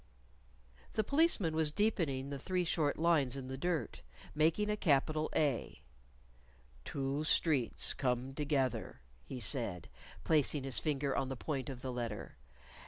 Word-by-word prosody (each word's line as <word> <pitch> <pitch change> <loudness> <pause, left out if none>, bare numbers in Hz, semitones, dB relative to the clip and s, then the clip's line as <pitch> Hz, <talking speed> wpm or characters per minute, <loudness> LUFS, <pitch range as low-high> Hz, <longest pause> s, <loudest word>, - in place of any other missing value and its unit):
The 220 - +1
Policeman 280 - +2
was 160 -1 +3
deepening 150 -9 0
the 140 - -4
three 180 +4 -1
short 155 -3 +1
lines 155 -6 +2
in 130 -1 -6
the 130 - -4
dirt, 170 +2 -2 0.3
making 160 +7 +2
a 210 - +1
capital 155 -3 +1
A. 135 - 0 1.0
"Two 140 - -2
streets 150 -5 +2
come 125 0 -1
together," 140 - -1 0.2
he 130 - -7
said, 115 - +1 0.3
placing 150 -2 +2
his 135 -2 0
finger 140 -3 -1
on 135 -1 -1
the 135 - -3
point 135 -2 -3
of 130 -2 -7
the 130 - -3
letter. 115 -4 -5
140 Hz, 140 wpm, -34 LUFS, 130-160 Hz, 1.0 s, was